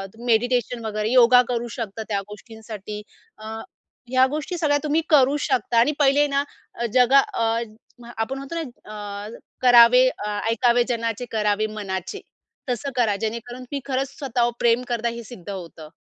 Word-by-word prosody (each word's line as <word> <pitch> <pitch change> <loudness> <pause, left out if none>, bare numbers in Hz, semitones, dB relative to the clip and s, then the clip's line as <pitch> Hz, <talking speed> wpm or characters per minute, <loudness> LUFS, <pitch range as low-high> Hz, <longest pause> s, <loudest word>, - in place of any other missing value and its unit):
त - - -18
मेडिटेशन 240 0 +1
वगैरे 215 +1 -2
योगा 250 0 +7
करू 240 -1 -2
शकता 220 -1 -5
त्या 200 -1 0
गोष्टींसाठी 215 -1 -9 0.4
अ, 215 - -12 0.6
ह्या 260 0 +4
गोष्टी 305 +5 -4
सगळ्या 295 -3 +2
तुम्ही 305 +2 +1
करू 280 -2 +5
शकता 245 -5 0
आणि 285 +6 +4
पहिले 285 +1 +4
ना 280 0 0 0.5
जगा 255 +2 +6
अ, 230 - -1 0.7
आपण 260 +5 -2
म्हणतो 275 +5 -7
ना 335 - -1 0.6
अ, - - -7 0.3
करावे 250 0 +7 0.2
"ऐकावे 230 +3 +2
जनाचे 230 0 -2
करावे 210 -1 +1
मनाचे" 190 -3 -5 0.5
तसं 270 +3 -2
करा 225 -5 +2
जेणेकरून 235 +3 -5
की 280 - -2
खरंच 270 0 -3
स्वतःवर 240 -4 0
प्रेम 235 +1 +3
करता 235 -1 -1
हे 235 0 -7
सिद्ध 210 -6 -11
होतं. 165 -5 -8
240 Hz, 150 wpm, -23 LUFS, 220-260 Hz, 0.7 s, योगा